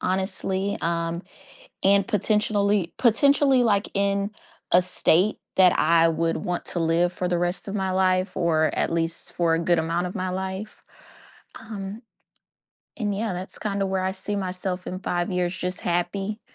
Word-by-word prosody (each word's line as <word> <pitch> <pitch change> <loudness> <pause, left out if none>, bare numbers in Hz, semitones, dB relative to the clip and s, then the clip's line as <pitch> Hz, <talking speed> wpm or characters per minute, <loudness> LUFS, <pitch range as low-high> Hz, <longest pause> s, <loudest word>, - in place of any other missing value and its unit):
honestly, 190 +1 -1
um, 170 +1 -1 0.6
and 200 0 +4
potentially- 205 -2 +1
potentially, 270 +2 +4
like, 205 -3 +2
in 200 0 0 0.4
a 180 - +6
state 180 +2 +2 0.2
that 185 -1 +6
I 165 +1 +4
would 165 0 0
want 175 -1 -3
to 175 - -4
live 170 +2 +2
for 180 - -2
the 175 -1 0
rest 175 +3 -2
of 200 - -4
my 190 -2 -1
life 185 0 +1
or 160 -3 +2
at - - 0
least 165 0 -2
for 170 -2 +2
a 165 - +2
good 170 +1 +2
amount 170 +2 -1
of 180 - -8
my 185 -2 -2
life. 190 +3 -5 0.8
Um, 210 0 -7 1.0
and, 205 -4 -1
yeah, 215 +1 -2
that's 185 +1 -6
kinda 200 -2 -1
where 190 -1 -1
I 190 - 0
see 200 +2 -4
myself 185 -1 -3
in 185 - -4
5 175 -1 -1
years 180 0 -1
just 180 0 -4
happy, 195 +5 -2
185 Hz, 165 wpm, -25 LUFS, 175-200 Hz, 1.0 s, a